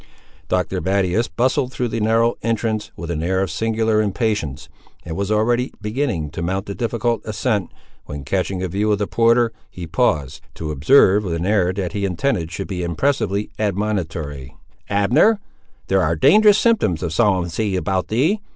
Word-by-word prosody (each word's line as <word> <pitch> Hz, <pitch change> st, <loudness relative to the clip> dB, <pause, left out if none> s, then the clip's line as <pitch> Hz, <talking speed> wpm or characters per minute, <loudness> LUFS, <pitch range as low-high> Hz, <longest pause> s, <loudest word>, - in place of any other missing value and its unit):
Dr. -, -, 0 dB
Battius 95 Hz, +5 st, +1 dB
bustled 125 Hz, -, 0 dB
through 125 Hz, -2 st, -2 dB
the 115 Hz, -, -2 dB
narrow 115 Hz, +2 st, +2 dB
entrance, 110 Hz, -1 st, -1 dB
with 85 Hz, 0 st, -6 dB
an 80 Hz, -2 st, -2 dB
air 95 Hz, +3 st, 0 dB
of 95 Hz, -, -3 dB
singular 110 Hz, +3 st, +1 dB
impatience, 100 Hz, -, -2 dB, 0.4 s
and 80 Hz, -, -5 dB
was 100 Hz, +2 st, -2 dB
already 120 Hz, +4 st, +1 dB
beginning 105 Hz, -, -2 dB
to 80 Hz, -, -6 dB
mount 95 Hz, +3 st, -2 dB
the 100 Hz, -, -5 dB
difficult 115 Hz, 0 st, -1 dB
ascent, 105 Hz, -2 st, -1 dB, 0.4 s
when 70 Hz, -1 st, -7 dB
catching 95 Hz, +4 st, -2 dB
a -, -, -1 dB
view 100 Hz, +4 st, 0 dB
of 105 Hz, -, +2 dB
the 105 Hz, -, -1 dB
porter, 115 Hz, +2 st, +3 dB, 0.2 s
he 90 Hz, -, -8 dB
paused, 80 Hz, -, 0 dB
to 80 Hz, -1 st, -4 dB
observe 95 Hz, -, +4 dB
with 85 Hz, -4 st, -2 dB
an 85 Hz, +1 st, -3 dB
air 95 Hz, -3 st, +2 dB
that 95 Hz, -3 st, -4 dB
he 100 Hz, -, -2 dB
intended 90 Hz, -2 st, -1 dB
should 95 Hz, +3 st, -5 dB
be 90 Hz, -2 st, -4 dB
impressively 105 Hz, +2 st, -1 dB
admonitory— 85 Hz, -10 st, -3 dB, 0.3 s
"Abner, 120 Hz, -, +3 dB, 0.5 s
there -, -, +2 dB
are -, -, +1 dB
dangerous 210 Hz, -1 st, +6 dB
symptoms 210 Hz, -, +2 dB
of 85 Hz, -3 st, -2 dB
somnolency 95 Hz, 0 st, +1 dB
about 95 Hz, 0 st, -1 dB
thee! 150 Hz, -, +1 dB
100 Hz, 170 wpm, -20 LUFS, 85-115 Hz, 0.5 s, dangerous